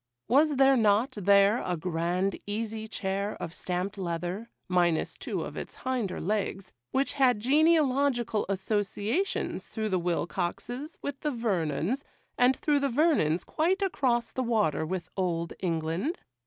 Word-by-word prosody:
Was 290 +6 +4
there 270 0 +5
not 220 +3 +3
there 200 +2 +4
a 180 -1 -1
grand 175 +3 -1
easy 220 +1 -3
chair 200 -1 -2
of 165 - -5
stamped 185 +3 -3
leather, 180 +5 -3 0.2
minus 175 -3 +1
two - - -3
of - - -7
its - - -6
hinder 250 -8 -1
legs, 195 0 -2 0.2
which 270 -1 0
had 260 -5 +3
genealogical 275 -4 +3
associations 205 - -1
through 220 -1 -2
the 185 -2 +1
Wilcoxes 180 - -3
with 285 -1 -4
the 300 - -1
Vernons, 210 - -1 0.3
and 250 +2 +4
through 295 -2 +1
the 280 0 +1
Vernons 250 - +2
quite 370 +5 0
across 240 - +1
the 260 - -2
water 210 - +1
with 185 0 -4
Old 170 -3 -1
England? 170 - -1
210 Hz, 140 wpm, -28 LUFS, 180-265 Hz, 0.3 s, there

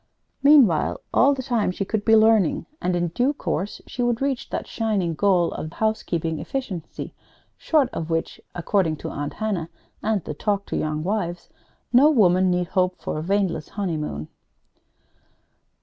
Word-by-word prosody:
Meanwhile, 270 - +5
all 280 +2 +5
the 260 - -5
time, 235 -6 0
she 190 +2 -3
could 210 +1 -2
be 225 +1 +5
learning, 220 -5 +4 0.2
and 180 0 0
in 175 -1 0
due 250 - +1
course 205 -7 -3
she 245 - -5
would 240 -1 +1
reach 275 -2 -2
that - - -3
shining 205 -7 -1
goal 180 0 +2
of 155 +1 -6
Housekeeping 170 -7 -1
Efficiency, 205 - -5 0.4
short 300 -5 +2
of 165 0 -4
which 165 0 -2
according 175 -2 +1
to - - -7
Aunt 145 0 -4
Hannah 195 -7 -2 0.3
and 215 -5 0
the - - -5
"Talk 200 +5 -1
to - - -4
Young 155 0 -2
Wives" 175 -3 -3 0.4
no 270 +5 +7
woman 185 - +4
need 180 0 0
hope 185 -1 +1
for - - -4
a - - -3
waneless 180 -3 -1
honeymoon. 155 - -3
190 Hz, 160 wpm, -23 LUFS, 170-225 Hz, 0.4 s, no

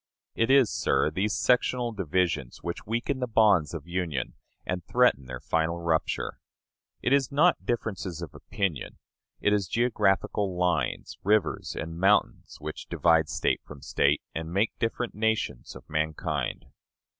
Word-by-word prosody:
It 115 - +1
is, 135 -4 +5
sir, 70 +3 +1
these 100 +3 0
sectional 125 -1 +2
divisions 85 - -1
which 85 +2 -5
weaken 120 +4 -1
the 125 - -1
bonds 105 -8 +4
of 80 -2 -6
union 85 -7 -2 0.3
and 90 -1 -3
threaten 120 - +2
their 65 -1 -6
final 80 +4 0
rupture. 85 -2 -1 0.6
It 125 - +2
is 140 -2 +2
not 160 +5 +3
differences 100 -7 -2
of 85 -6 -7
opinion 95 -9 -3 0.4
it 105 - +3
is 100 -3 +1
geographical 100 -3 +1
lines, 90 -3 -1
rivers 105 -5 +1
and 80 +1 -5
mountains 100 +3 +2
which 75 +1 -7
divide 80 -2 +3
State - - 0
from 70 -2 -12
State, - - +2
and 80 0 -5
make 100 +5 +2
different 115 +1 -1
nations 110 - -1
of - - -12
mankind. 75 0 -2
95 Hz, 145 wpm, -27 LUFS, 80-110 Hz, 0.6 s, is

